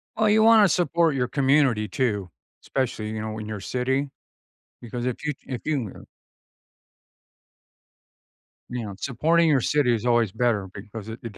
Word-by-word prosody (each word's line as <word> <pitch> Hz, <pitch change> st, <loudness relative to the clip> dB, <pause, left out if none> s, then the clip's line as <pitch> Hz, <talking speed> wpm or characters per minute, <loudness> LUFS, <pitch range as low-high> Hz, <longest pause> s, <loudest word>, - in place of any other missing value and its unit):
Oh, 220 Hz, -, +1 dB
you 215 Hz, +1 st, +4 dB
wanna 220 Hz, -2 st, +7 dB
support 170 Hz, -2 st, +2 dB
your 125 Hz, -2 st, 0 dB
community 135 Hz, -5 st, +2 dB
too, 105 Hz, -9 st, -1 dB, 0.3 s
especially, 125 Hz, -5 st, -2 dB
you 110 Hz, 0 st, -4 dB
know, 110 Hz, 0 st, -5 dB
in 110 Hz, -, -6 dB
your 110 Hz, -1 st, -5 dB
city, 130 Hz, +6 st, -1 dB, 0.7 s
because 120 Hz, +1 st, -5 dB
if 125 Hz, +2 st, -3 dB
you 150 Hz, -, 0 dB
if 125 Hz, -3 st, -5 dB
you, 135 Hz, -10 st, -1 dB
uh -, -, -11 dB, 2.7 s
you 125 Hz, -1 st, -4 dB
know, 100 Hz, -, -7 dB
supporting 165 Hz, +6 st, +2 dB
your 145 Hz, -4 st, +3 dB
city 140 Hz, -1 st, +2 dB
is 115 Hz, +1 st, -2 dB
always 120 Hz, -4 st, +2 dB
better, 110 Hz, -3 st, 0 dB
because 105 Hz, +1 st, -9 dB
it 110 Hz, +1 st, -7 dB
it 115 Hz, -3 st, -8 dB
125 Hz, 160 wpm, -24 LUFS, 110-145 Hz, 2.7 s, wanna